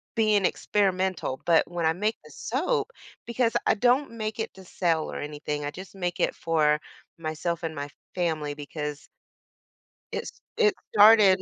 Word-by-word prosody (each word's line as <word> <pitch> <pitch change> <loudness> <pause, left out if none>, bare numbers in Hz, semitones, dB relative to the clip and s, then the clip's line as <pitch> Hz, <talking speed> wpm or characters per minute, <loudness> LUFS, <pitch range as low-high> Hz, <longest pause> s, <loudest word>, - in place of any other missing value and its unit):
being 215 -4 +3
experimental. 185 -10 0
But 170 -2 +4
when 175 -1 -2
I 160 - +4
make 210 +6 0
the 150 - -15
soap, 260 - -1 0.4
because 235 -1 +1
I - - +5
don't 250 +6 +2
make 220 -1 -4
it 220 - -3
to 190 - -13
sell 170 -3 0
or - - -5
anything, 150 0 -4
I 145 - -3
just 185 +4 -10
make 180 -2 -3
it - - +2
for 150 -2 +2 0.4
myself 165 +1 -3
and 160 -1 -3
my 145 0 -4 0.2
family 160 -5 -1
because 150 0 -6 1.1
it's - - -4 0.3
it 430 -3 +4 0.2
started 205 -3 +7
175 Hz, 160 wpm, -27 LUFS, 155-215 Hz, 1.1 s, started